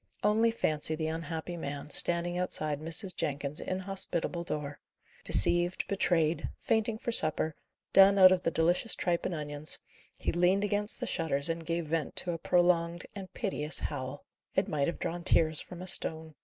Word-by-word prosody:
Only 220 Hz, +2 st, +3 dB
fancy 155 Hz, -8 st, 0 dB
the 155 Hz, 0 st, -3 dB
unhappy 165 Hz, +1 st, -5 dB
man, 145 Hz, -2 st, -6 dB
standing 175 Hz, +3 st, +3 dB
outside 155 Hz, -5 st, 0 dB
Mrs. 170 Hz, +4 st, 0 dB
Jenkins's 145 Hz, -1 st, -3 dB
inhospitable 185 Hz, -2 st, -2 dB
door! 145 Hz, -3 st, -5 dB, 0.4 s
Deceived, 175 Hz, -, +4 dB
betrayed, 165 Hz, -5 st, 0 dB
fainting 220 Hz, 0 st, 0 dB
for 235 Hz, -, -4 dB
supper, 155 Hz, -5 st, +2 dB, 0.4 s
done 195 Hz, +1 st, +7 dB
out 185 Hz, -1 st, +8 dB
of 185 Hz, -1 st, +2 dB
the -, -, 0 dB
delicious 175 Hz, +6 st, +1 dB
tripe 175 Hz, -2 st, -1 dB
and 180 Hz, -, -4 dB
onions, 150 Hz, 0 st, -1 dB, 0.4 s
he -, -, -2 dB
leaned 180 Hz, +3 st, +2 dB
against 205 Hz, +1 st, -1 dB
the -, -, -1 dB
shutters, 145 Hz, -2 st, 0 dB
and 165 Hz, 0 st, -4 dB
gave 170 Hz, 0 st, -2 dB
vent 155 Hz, -1 st, -3 dB
to 180 Hz, -, 0 dB
a 165 Hz, -, -5 dB
prolonged 175 Hz, -1 st, +1 dB
and 195 Hz, -2 st, -9 dB
piteous 170 Hz, -8 st, -2 dB
howl. 140 Hz, -1 st, -5 dB, 0.3 s
It -, -, +1 dB
might 140 Hz, -2 st, -1 dB
have 170 Hz, -, -3 dB
drawn 170 Hz, +1 st, -4 dB
tears 160 Hz, -3 st, +2 dB
from 180 Hz, 0 st, -10 dB
a -, -, -8 dB
stone. 160 Hz, -3 st, -2 dB
170 Hz, 170 wpm, -30 LUFS, 155-185 Hz, 0.4 s, out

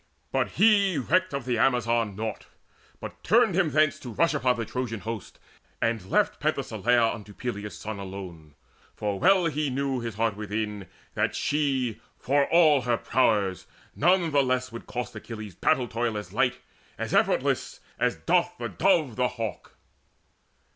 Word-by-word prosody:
But -, -, 0 dB
he 200 Hz, -5 st, +4 dB
Recked 185 Hz, +8 st, +1 dB
of 140 Hz, -3 st, -4 dB
the 120 Hz, -3 st, 0 dB
Amazon 115 Hz, -5 st, +2 dB
naught, 110 Hz, +1 st, -5 dB, 0.5 s
but -, -, -9 dB
turned -, -, +4 dB
him 175 Hz, -2 st, +2 dB
thence 155 Hz, 0 st, +2 dB
To 125 Hz, -, -8 dB
rush 165 Hz, +8 st, +1 dB
upon 130 Hz, -4 st, +2 dB
the 115 Hz, -1 st, -3 dB
Trojan 115 Hz, -2 st, -4 dB
host, 115 Hz, -3 st, -6 dB, 0.4 s
and 110 Hz, -5 st, -1 dB
left -, -, +2 dB
Penthesileia 120 Hz, -1 st, +1 dB
unto 105 Hz, -2 st, -10 dB
Peleus' 105 Hz, -4 st, -5 dB
son 105 Hz, -1 st, -6 dB
Alone, 90 Hz, -6 st, -9 dB, 0.4 s
for 100 Hz, -2 st, -2 dB
well 190 Hz, -2 st, +4 dB
he 150 Hz, -2 st, 0 dB
knew 135 Hz, 0 st, -1 dB
his 115 Hz, -3 st, -5 dB
heart 110 Hz, -1 st, 0 dB
within 105 Hz, -1 st, -4 dB, 0.3 s
That -, -, 0 dB
she, 135 Hz, -7 st, 0 dB, 0.2 s
for 140 Hz, +1 st, +1 dB
all 155 Hz, -5 st, +5 dB
her 120 Hz, -1 st, +1 dB
prowess, 105 Hz, -8 st, +1 dB, 0.3 s
none 175 Hz, +1 st, +3 dB
the 145 Hz, -1 st, +4 dB
less 130 Hz, -1 st, 0 dB
Would 115 Hz, -, -9 dB
cost 125 Hz, 0 st, -5 dB
Achilles 110 Hz, -4 st, -8 dB
battle 125 Hz, +8 st, +1 dB
toil 115 Hz, -1 st, -2 dB
as 105 Hz, -, -7 dB
light, -, -, +1 dB, 0.4 s
As -, -, -4 dB
effortless, -, -, +1 dB, 0.2 s
as -, -, +1 dB
doth -, -, +1 dB
the -, -, -4 dB
dove 140 Hz, -9 st, +2 dB
the 125 Hz, 0 st, +2 dB
hawk. 115 Hz, -3 st, -6 dB
120 Hz, 160 wpm, -26 LUFS, 110-140 Hz, 0.5 s, all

